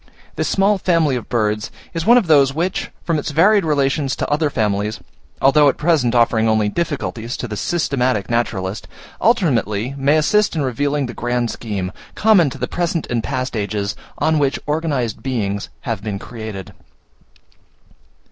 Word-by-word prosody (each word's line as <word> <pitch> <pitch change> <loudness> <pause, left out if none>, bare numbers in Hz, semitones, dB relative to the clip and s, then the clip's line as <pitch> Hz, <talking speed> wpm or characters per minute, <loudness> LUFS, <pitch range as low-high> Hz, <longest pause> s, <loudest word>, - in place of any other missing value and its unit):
This - - -1
small 195 +1 +2
family 165 -7 +2
of 120 - -5
birds 105 -2 0 0.2
is 165 +2 -3
one 240 +2 +8
of 240 - +3
those 140 -4 +4
which, 175 +4 -1
from 165 -3 0
its 145 - -4
varied 190 +7 +4
relations 140 -2 +1
to - - -3
other 150 +1 +2
families, 105 -1 -1 0.4
although 145 +2 +5
at - - -2
present 150 -7 +2
offering 115 -2 +3
only 110 -1 +2
difficulties 130 -5 -3
to 125 - -4
the 105 - -5
systematic 130 - 0
naturalist, 105 -4 -2 0.3
ultimately 130 - +1
may 140 +3 +3
assist 205 +6 +2
in 155 - 0
revealing 140 +3 0
the 120 - -6
grand 120 0 -1
scheme, 100 -5 -4 0.2
common 200 -8 +4
to - - -8
the - - -2
present 170 -2 -1
and 120 -2 0
past 130 -2 -3
ages, 105 -1 -2 0.2
on 160 -1 +2
which 140 -1 +1
organized 145 -7 -1
beings 100 -6 -2
have 115 -6 -3
been 105 -1 -4
created. 110 -4 -8
135 Hz, 160 wpm, -19 LUFS, 110-155 Hz, 0.4 s, one